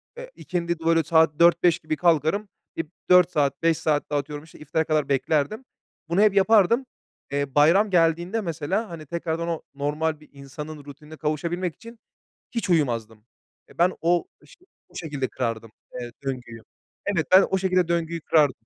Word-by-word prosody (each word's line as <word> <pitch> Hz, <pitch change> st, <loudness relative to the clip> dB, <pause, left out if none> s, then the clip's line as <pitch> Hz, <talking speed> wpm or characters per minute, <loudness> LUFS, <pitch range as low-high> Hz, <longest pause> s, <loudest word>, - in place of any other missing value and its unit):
ööö, -, -, -8 dB
eee, -, -, -12 dB
ikindide, 170 Hz, -2 st, -3 dB
böyle, 165 Hz, -1 st, +3 dB
saat 160 Hz, -1 st, +3 dB
4-5 170 Hz, 0 st, +4 dB
gibi 155 Hz, 0 st, -3 dB
kalkarım. 170 Hz, +5 st, +1 dB, 0.3 s
Eee, 165 Hz, -, -2 dB, 0.3 s
4 180 Hz, -1 st, +6 dB
saat, 145 Hz, -2 st, 0 dB
5 165 Hz, -1 st, +3 dB
saat 155 Hz, -2 st, 0 dB
daha 145 Hz, -1 st, +1 dB
atıyorum, 145 Hz, +1 st, -7 dB
işte, 160 Hz, -, -17 dB
iftara 155 Hz, +2 st, -1 dB
kadar 155 Hz, -3 st, 0 dB
beklerdim. 145 Hz, -, 0 dB, 0.4 s
Bunu 175 Hz, +4 st, +2 dB
hep 215 Hz, -2 st, +5 dB
yapardım. 220 Hz, +5 st, +4 dB, 0.5 s
Eee, 140 Hz, -1 st, -2 dB
bayram 170 Hz, +9 st, +5 dB
geldiğinde 175 Hz, +4 st, +1 dB
mesela, 175 Hz, +5 st, -2 dB
hani, 165 Hz, -2 st, -8 dB
tekrardan 170 Hz, +1 st, -3 dB
o 165 Hz, -2 st, -2 dB
normal 150 Hz, +2 st, -2 dB
bir 150 Hz, -, -19 dB
insanın 145 Hz, +2 st, -9 dB
rutinine 150 Hz, +2 st, -12 dB
kavuşabilmek 165 Hz, +3 st, -2 dB
için 230 Hz, 0 st, -13 dB, 0.5 s
hiç 230 Hz, -6 st, -3 dB
uyumazdım. 115 Hz, -9 st, 0 dB, 0.4 s
Eee, -, -, -20 dB
ben 180 Hz, +2 st, +4 dB
o 175 Hz, +1 st, +1 dB, 0.2 s
iş -, -, -18 dB, 0.3 s
o 175 Hz, -, -25 dB
şekilde 145 Hz, -7 st, -4 dB
kırardım, 115 Hz, -3 st, -4 dB, 0.3 s
eee, 120 Hz, -1 st, -7 dB
döngüyü. 120 Hz, -4 st, -5 dB, 0.4 s
Evet, 180 Hz, -6 st, 0 dB
ben 190 Hz, +1 st, +8 dB
o 190 Hz, -, +2 dB
şekilde 185 Hz, -2 st, +1 dB
döngüyü 170 Hz, -1 st, -1 dB
kırardım. 145 Hz, -8 st, +2 dB
160 Hz, 165 wpm, -24 LUFS, 145-175 Hz, 0.5 s, ben